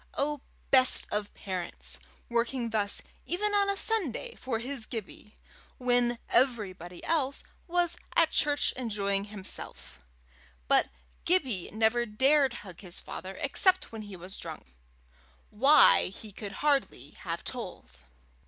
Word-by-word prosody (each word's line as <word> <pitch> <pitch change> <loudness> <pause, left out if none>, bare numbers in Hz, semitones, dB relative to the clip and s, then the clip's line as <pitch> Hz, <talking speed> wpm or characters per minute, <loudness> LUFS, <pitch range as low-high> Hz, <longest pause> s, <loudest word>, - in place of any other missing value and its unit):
Oh, 290 0 -1 0.3
best 260 -1 +7
of 210 0 -2
parents! 185 -3 -4 0.3
working 235 0 -1
thus 205 -2 +1 0.2
even 415 +4 -1
on 400 -1 +3
a 400 - 0
Sunday 395 - 0
for 255 -3 -3
his 245 0 -3
Gibbie, 215 -1 -8 0.4
when 245 -1 +2
everybody 190 -9 0
else 285 -4 0 0.2
was 345 0 0 0.2
at 330 -1 +4
church 290 -1 +2
enjoying 200 -5 -1
himself! 190 - -5 0.6
But - - +4 0.4
Gibbie 265 - +1
never 225 +2 +2
dared 265 +5 +3
hug 180 -1 -11
his 180 -3 -3
father 190 0 -8
except 370 +7 +3
when 225 -1 -7
he 205 -2 -9
was 185 +3 -7
drunk 155 - -9 0.8
why, 275 +7 +6
he 210 +3 -9
could 200 0 -7
hardly 280 -3 +1
have - - -6
told. 65 +1 -7
235 Hz, 125 wpm, -29 LUFS, 200-280 Hz, 0.8 s, best